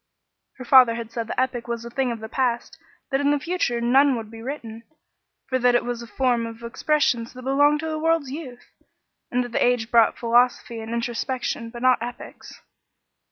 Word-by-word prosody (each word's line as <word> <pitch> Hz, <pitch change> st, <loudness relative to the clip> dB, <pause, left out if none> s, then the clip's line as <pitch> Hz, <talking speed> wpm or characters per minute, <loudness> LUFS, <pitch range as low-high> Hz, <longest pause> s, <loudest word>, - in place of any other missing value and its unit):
Her 255 Hz, -, -10 dB
father 250 Hz, -2 st, +7 dB
had 230 Hz, -1 st, -6 dB
said 230 Hz, -1 st, -4 dB
the -, -, -3 dB
epic 255 Hz, -2 st, -1 dB
was 235 Hz, -1 st, -4 dB
a 235 Hz, -, -8 dB
thing 260 Hz, -1 st, 0 dB
of 230 Hz, -2 st, -6 dB
the 220 Hz, -, -6 dB
past, 245 Hz, +4 st, -1 dB, 0.4 s
that 270 Hz, +1 st, +1 dB
in 285 Hz, -, +2 dB
the 290 Hz, -, +3 dB
future 310 Hz, -7 st, -1 dB
none 265 Hz, +3 st, +4 dB
would 225 Hz, -2 st, -6 dB
be 225 Hz, 0 st, -10 dB
written, 230 Hz, -4 st, -7 dB, 0.7 s
for 260 Hz, -1 st, 0 dB
that 245 Hz, 0 st, +3 dB
it 240 Hz, -, +1 dB
was 240 Hz, -1 st, -3 dB
a 235 Hz, -, -9 dB
form 245 Hz, -2 st, 0 dB
of 230 Hz, 0 st, -10 dB
expressions 240 Hz, -1 st, 0 dB
that 255 Hz, 0 st, -10 dB
belonged 290 Hz, +3 st, +3 dB
to 320 Hz, -, -4 dB
the 310 Hz, 0 st, -3 dB
world's 325 Hz, -4 st, +1 dB
youth, 265 Hz, -5 st, -9 dB, 0.6 s
and 250 Hz, 0 st, 0 dB
that 245 Hz, -1 st, -1 dB
age 245 Hz, -2 st, +1 dB
brought 230 Hz, -2 st, +4 dB
philosophy 240 Hz, 0 st, +1 dB
and 220 Hz, 0 st, -7 dB
introspection, 235 Hz, 0 st, -3 dB
but 240 Hz, +1 st, -9 dB
not 255 Hz, -2 st, +4 dB
epics. 240 Hz, +1 st, -9 dB
245 Hz, 200 wpm, -23 LUFS, 235-265 Hz, 0.7 s, father